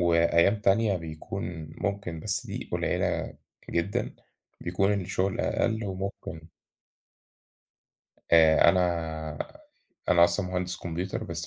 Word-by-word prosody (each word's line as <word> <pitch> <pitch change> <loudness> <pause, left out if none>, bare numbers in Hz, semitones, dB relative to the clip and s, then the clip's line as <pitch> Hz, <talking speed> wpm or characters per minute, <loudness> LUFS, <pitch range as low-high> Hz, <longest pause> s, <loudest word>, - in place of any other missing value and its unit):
وأيام 85 +3 +4
تانية 100 -1 +3
بيكون 80 0 -6
ممكن 100 -5 -2
بس - - -2
دي - - -6
قليلة - - -1 0.4
جدًا، 85 +4 -1 0.5
بيكون 95 +4 +1
الشغل 95 +1 -1
أقل 110 -1 0
وممكن 95 -2 -5 1.9
آآ 80 -1 +7
أنا 80 -4 0 0.7
أنا 85 -1 +7
أصلًا 90 +2 +1
مهندس 90 0 -2
كمبيوتر 90 +2 -4
بس - - -4
90 Hz, 100 wpm, -28 LUFS, 85-95 Hz, 1.9 s, آآ